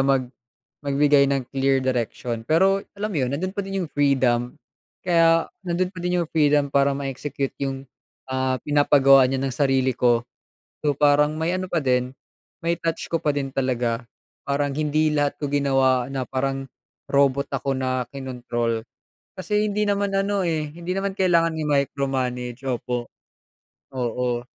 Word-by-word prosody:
mag 135 -2 +1 0.5
magbigay 140 0 +4
ng 135 -2 -1
clear 135 -1 +1
direction 120 -2 -2
pero 190 +7 +3 0.2
alam 210 +1 -2
mo 190 - -4
yun, 125 - -3
nando'n 185 +6 -2
pa 200 - -3
din 195 -2 -2
yung - - -8
freedom. 130 -4 +1 0.5
Kaya 165 -2 +4 0.2
nando'n 180 +1 -1
pa 180 - -10
din 180 0 0
yung 165 - -3
freedom 145 -2 +3
para 140 0 +3
ma-execute 140 0 -4
yung, 135 0 -3 0.4
ah, 130 0 0
pinapagawa 140 -2 +5
niya 135 0 -1
ng 135 -1 -2
sarili 130 -1 +2
ko. 120 -1 +3 0.6
So, 145 - +3
parang 150 +1 +3
may 165 +2 0
ano 185 0 -4
pa 170 -3 0
din, 125 0 +1 0.5
may 170 0 +1
touch 165 -1 -2
ko 165 - +1
pa 150 -3 +1
din 135 -1 -2
talaga. 125 -3 -1 0.4
Parang 140 0 0
hindi 155 0 +1
lahat 145 -1 0
ko 145 - -2
ginawa 135 -3 +2
na 130 -1 -2
parang 135 0 -2 0.4
robot 140 0 +2
ako 135 0 -1
na 130 -1 -1
kinontrol. 120 -4 -3 0.6
Kasi 210 +3 0
hindi 210 +1 0
naman 200 -1 0
ano 200 +1 +1
eh, 155 -3 -1
hindi 175 +2 -5
naman 195 0 -1
kailangan 170 -3 +3
i-micromanage, 135 -4 -1
opo. 125 -2 -3 0.9
Oo. 120 -1 -1
140 Hz, 155 wpm, -23 LUFS, 130-160 Hz, 0.9 s, pinapagawa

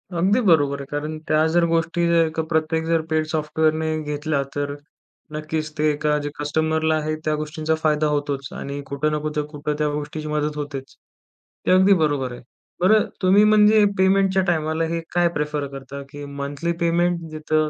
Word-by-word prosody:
अगदी 190 +7 +3
बरोबर 145 - +3
आहे. 140 - -6
कारण 150 +2 -3
त्या 155 0 +3
जर 175 0 +4
गोष्टी 165 +1 0
जर 165 -1 +3
का 160 - 0
प्रत्येक 160 0 0
जर 165 -1 +2
पेड 155 0 +1
सॉफ्टवेअरने 155 0 0
घेतल्या, 150 -1 -1
तर 145 0 -2 0.6
नक्कीच 155 0 -3
ते 155 +1 +2
एका 150 0 0
जे - - -1
कस्टमरला 160 +1 +1
आहे 155 0 -1
त्या 155 - +1
गोष्टींचा 155 +1 -2
फायदा 155 -1 +2
होतोच 145 -2 -2
आणि 140 +1 -5
कुठं 140 +2 -1
ना 150 - 0
कुठं 150 0 -2
कुठं 150 0 -4
त्या 150 0 +1
गोष्टीची 150 +1 -5
मदत 150 0 -1
होतेच, 140 -2 -6 0.7
ते - - +2
अगदी 190 +2 +6
बरोबर 140 -4 0
आहे. 120 - -9 0.4
बरं 215 +4 +5 0.2
तुम्ही 190 +3 +5
म्हणजे 215 0 +6
पेमेंटच्या 190 0 +3
टायमाला 160 -1 0
हे 170 - -1
काय 175 0 +3
प्रेफर 150 -1 -2
करता? 135 +1 -8
की 145 0 -8
मंथली 140 +4 -4
पेमेंट, 170 +1 +2
जिथं 155 0 0
155 Hz, 175 wpm, -22 LUFS, 150-165 Hz, 0.7 s, अगदी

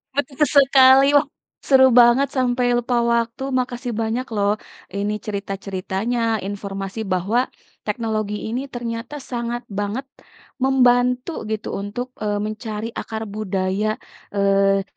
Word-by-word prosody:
Betul 285 +1 0
sekali 270 0 +7
loh. 285 - +5 0.4
Seru 265 -1 +7
banget 240 +4 +6
sampai 250 -1 +1
lupa 245 +1 -1 0.2
waktu. 235 +3 -1 0.2
Makasih 245 -1 -3
banyak 230 +3 -1
loh 205 0 +2 0.5
ini 205 +1 -1
cerita-ceritanya, 195 +2 -3 0.3
informasi 195 0 -5
bahwa 195 +7 +1 0.5
teknologi 215 -1 -2
ini 240 +4 -2
ternyata 235 +3 -5 0.2
sangat 240 0 -2 0.2
banget 205 +7 -2 0.6
membantu 250 +1 +3 0.2
gitu 215 0 -3
untuk, 210 +5 -4 0.2
eee, 205 -1 0
mencari 215 0 -4
akar 220 0 -5
budaya, 195 0 -1 0.5
eee, 195 0 +3
230 Hz, 110 wpm, -21 LUFS, 205-250 Hz, 0.6 s, sekali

